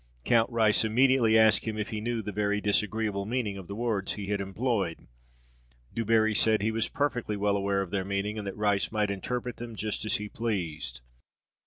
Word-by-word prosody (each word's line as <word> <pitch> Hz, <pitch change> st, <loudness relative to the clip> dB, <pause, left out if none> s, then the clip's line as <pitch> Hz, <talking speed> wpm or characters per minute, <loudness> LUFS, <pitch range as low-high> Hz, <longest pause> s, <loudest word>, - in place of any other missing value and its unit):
Count 115 Hz, 0 st, +3 dB
Rice 110 Hz, -3 st, +3 dB
immediately 115 Hz, 0 st, +4 dB
asked 110 Hz, -1 st, +5 dB
him 110 Hz, -1 st, -3 dB
if 105 Hz, 0 st, -3 dB
he 110 Hz, -1 st, -4 dB
knew 115 Hz, 0 st, -2 dB
the 105 Hz, -, -4 dB
very 105 Hz, 0 st, 0 dB
disagreeable 105 Hz, 0 st, 0 dB
meaning 115 Hz, -4 st, -1 dB
of 95 Hz, -3 st, -9 dB
the 100 Hz, -, -6 dB
words 110 Hz, -4 st, -1 dB
he 105 Hz, -, -6 dB
had 100 Hz, -1 st, 0 dB
employed. 100 Hz, -3 st, -2 dB, 0.9 s
Du 115 Hz, -, -1 dB
Barri 110 Hz, 0 st, +3 dB
said 110 Hz, -1 st, +3 dB
he 110 Hz, -, +1 dB
was 115 Hz, 0 st, 0 dB
perfectly 125 Hz, -7 st, -1 dB
well 100 Hz, 0 st, +1 dB
aware 100 Hz, 0 st, 0 dB
of 90 Hz, -, -10 dB
their 100 Hz, -2 st, 0 dB
meaning, 100 Hz, +2 st, -2 dB
and 100 Hz, -, -5 dB
that 100 Hz, -, -5 dB
Rice 105 Hz, -2 st, +1 dB
might 105 Hz, -2 st, 0 dB
interpret 125 Hz, +5 st, -4 dB
them 120 Hz, -1 st, -7 dB
just 105 Hz, 0 st, -3 dB
as 110 Hz, -, +1 dB
he 105 Hz, -, -3 dB
pleased. 80 Hz, -, -3 dB
105 Hz, 200 wpm, -28 LUFS, 100-115 Hz, 0.9 s, asked